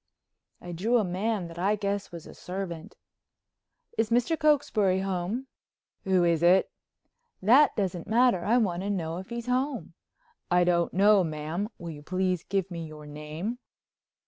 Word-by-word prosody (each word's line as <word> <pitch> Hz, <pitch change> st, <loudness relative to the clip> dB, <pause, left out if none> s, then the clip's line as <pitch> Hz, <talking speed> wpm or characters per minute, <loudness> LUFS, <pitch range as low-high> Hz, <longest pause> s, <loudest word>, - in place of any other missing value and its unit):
I 175 Hz, -, -8 dB
drew 215 Hz, +9 st, +1 dB
a 225 Hz, -, +2 dB
man 190 Hz, +1 st, -2 dB
that 165 Hz, 0 st, -10 dB
I 200 Hz, +4 st, +2 dB
guess 200 Hz, -1 st, -3 dB
was 170 Hz, -2 st, -9 dB
a -, -, -11 dB
servant: 180 Hz, -3 st, -6 dB, 1.0 s
"Is 225 Hz, -1 st, +2 dB
Mr. 240 Hz, +7 st, +2 dB
Cokesbury 260 Hz, -, +2 dB
home?" 195 Hz, +6 st, -2 dB, 0.6 s
"Who 190 Hz, -2 st, +3 dB
is 170 Hz, -2 st, +2 dB
it?" 180 Hz, +2 st, +4 dB, 0.7 s
"That 255 Hz, +10 st, +5 dB
doesn't 185 Hz, -4 st, -2 dB
matter. 230 Hz, -5 st, +3 dB
I 230 Hz, +6 st, +3 dB
want 185 Hz, -7 st, 0 dB
to 200 Hz, -, -3 dB
know 170 Hz, -4 st, -2 dB
if 190 Hz, -, -10 dB
he's 235 Hz, -1 st, -5 dB
home." 255 Hz, +2 st, -1 dB, 0.6 s
"I 180 Hz, 0 st, +4 dB
don't 175 Hz, -1 st, +2 dB
know, 200 Hz, +1 st, +5 dB
ma'am. 160 Hz, +5 st, -3 dB
Will 170 Hz, -1 st, -7 dB
you 145 Hz, -2 st, -10 dB
please 185 Hz, +2 st, -1 dB
give 195 Hz, -1 st, -2 dB
me 165 Hz, -2 st, -5 dB
your 155 Hz, -1 st, -11 dB
name?" 155 Hz, +10 st, -5 dB
190 Hz, 160 wpm, -28 LUFS, 170-220 Hz, 1.0 s, That